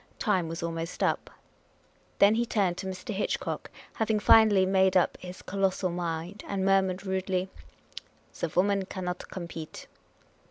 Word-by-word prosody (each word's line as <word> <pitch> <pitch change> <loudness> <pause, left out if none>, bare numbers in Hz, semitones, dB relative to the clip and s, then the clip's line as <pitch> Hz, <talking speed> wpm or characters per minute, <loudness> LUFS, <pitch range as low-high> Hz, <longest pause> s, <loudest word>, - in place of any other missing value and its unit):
Time 190 -7 +1
was 165 +1 -5
almost 165 0 -3
up. - - 0 0.9
Then 200 +1 +6
he 230 +2 +2
turned 200 -6 0
to 190 - -4
Mr. 190 +5 -5
Hitchcock, 200 - -2 0.2
having 220 -1 0
finally 205 -2 +6
made 190 0 +3
up 180 - +2
his 180 0 -9
colossal 190 -1 0
mind, 175 +3 -4
and 195 -1 -1
murmured 195 -1 +2
rudely, 190 0 -1 0.4
" - - -15
The 170 - -1
woman 195 +3 +1
cannot 180 -2 -5
compete." 170 -3 -7
190 Hz, 145 wpm, -28 LUFS, 180-200 Hz, 0.9 s, Then